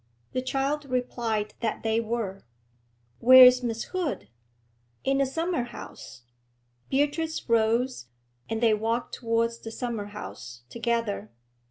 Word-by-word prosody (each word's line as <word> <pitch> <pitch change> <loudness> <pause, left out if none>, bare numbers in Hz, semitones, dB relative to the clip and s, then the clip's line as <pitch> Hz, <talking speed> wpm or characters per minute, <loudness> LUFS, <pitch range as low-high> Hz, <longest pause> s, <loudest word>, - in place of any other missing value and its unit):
The 255 - 0
child 275 +3 -1
replied 235 -5 -2
that 225 -2 -2
they 225 0 +2
were. 220 -4 -3 0.8
'Where 255 +2 +10
is 250 0 +6
Miss 230 -2 -2
Hood?' 310 - -3 0.7
'In 270 0 +1
the 275 - +3
summer 330 +3 -1
house.' 240 - -10 0.7
Beatrice 295 +4 0
rose, 230 - +1 0.4
and 225 0 -2
they 225 -2 +5
walked 225 +3 -1
towards 230 0 0
the 225 - -8
summer 230 -2 -4
house 120 - -9
together. 230 - -2
235 Hz, 125 wpm, -27 LUFS, 220-260 Hz, 0.8 s, Where